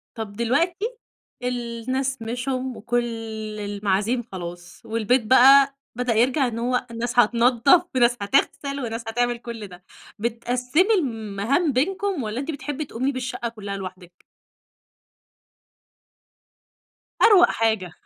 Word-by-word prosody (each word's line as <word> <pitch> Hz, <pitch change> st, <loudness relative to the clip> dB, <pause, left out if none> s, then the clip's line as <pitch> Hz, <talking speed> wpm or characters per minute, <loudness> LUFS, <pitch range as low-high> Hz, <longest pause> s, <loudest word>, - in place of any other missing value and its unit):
طَب 220 Hz, -3 st, -6 dB
دلوقتي، 330 Hz, -, 0 dB, 0.6 s
الناس 250 Hz, +2 st, -2 dB
مشيوا 255 Hz, +2 st, -3 dB
وكل 240 Hz, +2 st, 0 dB, 0.6 s
المعازيم 205 Hz, +3 st, -1 dB
خلاص، 175 Hz, -1 st, -8 dB
والبيت 230 Hz, +2 st, +1 dB
بقى 275 Hz, +3 st, +7 dB, 0.2 s
بدأ 245 Hz, -1 st, 0 dB
يرجع 250 Hz, +4 st, +2 dB
إن 230 Hz, -1 st, -4 dB
هو 250 Hz, +1 st, 0 dB
الناس 240 Hz, +1 st, -1 dB
هتنضّف 245 Hz, +8 st, +4 dB
في 255 Hz, -, +1 dB
ناس 240 Hz, 0 st, +4 dB
هتغسل 275 Hz, +5 st, 0 dB
وناس 230 Hz, -1 st, -4 dB
هتعمل 240 Hz, +1 st, 0 dB
كُلّ 230 Hz, -3 st, -8 dB
ده، 180 Hz, 0 st, -14 dB, 0.4 s
بتقسِّمي 250 Hz, -, +1 dB
المهام 245 Hz, -, 0 dB
بينكم، 370 Hz, -, 0 dB
والَّا 215 Hz, +3 st, -3 dB
أنتِ 280 Hz, +4 st, -3 dB
بتحبي 290 Hz, +1 st, -5 dB
تقومي 260 Hz, +3 st, -2 dB
بالشقة 250 Hz, -2 st, -4 dB
كلّها 200 Hz, -3 st, -6 dB
لوحدِك؟ 185 Hz, -2 st, -10 dB, 3.0 s
أروق 370 Hz, -5 st, +7 dB
حاجة، 220 Hz, -6 st, 0 dB
240 Hz, 115 wpm, -23 LUFS, 225-265 Hz, 3.0 s, بقى